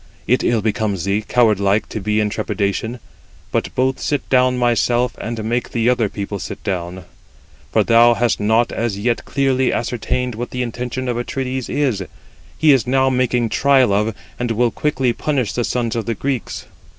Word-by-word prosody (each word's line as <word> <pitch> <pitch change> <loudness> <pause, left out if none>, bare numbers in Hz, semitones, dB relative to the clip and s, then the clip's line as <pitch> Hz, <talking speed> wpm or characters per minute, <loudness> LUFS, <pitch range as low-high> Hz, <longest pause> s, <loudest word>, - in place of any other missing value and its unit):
it 125 - +2
ill 115 -3 +1
becomes 105 -4 -1
thee, 100 +2 0
coward 110 -2 +2
like, 100 +1 +1
to - - -5
be 105 +1 0
in 105 - +2
trepidation; 110 +2 -2 0.5
but - - 0
both 130 +1 +1
sit 145 -3 -2
down 125 -1 +3
thyself, 120 0 +1
and 115 -1 -4
make 120 +2 -1
the 115 -1 +1
other 120 -4 +2
people 100 0 -5
sit - - -7
down, 90 -2 -3 0.7
for - - +3
thou 120 +1 +5
hast 120 -1 +1
not 110 +3 +2
as 115 -3 -2
yet 115 +3 0
clearly 135 -2 +1
ascertained 125 +1 -2
what 120 +3 -5
the 125 0 -2
intention 125 +2 -4
of 120 -1 -1
Atrides 130 +1 -3
is. 130 -10 0 0.5
He 155 -1 +5
is 130 -3 +3
now 130 +1 +3
making 125 -2 +1
trial 135 -5 +3
of, 105 +2 0 0.2
and 120 0 -1
will 115 +1 +1
quickly 130 -4 0
punish 130 -7 -1
the 120 - -1
sons 115 +2 -1
of 115 -3 -3
the 115 - -1
Greeks. 130 +2 -3
120 Hz, 180 wpm, -19 LUFS, 110-125 Hz, 0.7 s, thou